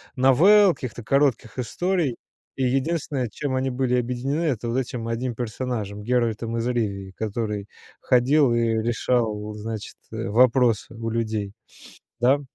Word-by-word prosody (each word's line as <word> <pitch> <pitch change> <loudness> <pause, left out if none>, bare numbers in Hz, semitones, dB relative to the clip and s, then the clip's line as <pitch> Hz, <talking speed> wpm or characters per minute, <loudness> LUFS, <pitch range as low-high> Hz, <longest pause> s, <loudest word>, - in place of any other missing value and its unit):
новелл, 175 +10 +6
каких-то 120 -3 -7
коротких 135 -3 +1
историй, 165 - 0 0.4
и 135 - -1
единственное, 135 0 0
чем 130 +5 -3
они 130 +1 0
были 125 -1 0
объединены- 125 +6 -2
это 120 -7 -1
вот 120 - -1
этим 120 -3 -3
1 120 +1 -2
персонажем- 110 -3 -4
Геральтом 115 -1 0
из 115 - -1
Ривии, 100 -6 -2
который 105 0 -3 0.3
ходил 130 +1 +3
и 120 - +2
решал, 115 -1 0
значит, 110 0 -6
вопросы 115 +1 +2
у 115 0 -4
людей, 110 -3 -2 0.7
да? 130 +4 +3
120 Hz, 130 wpm, -24 LUFS, 110-130 Hz, 0.7 s, новелл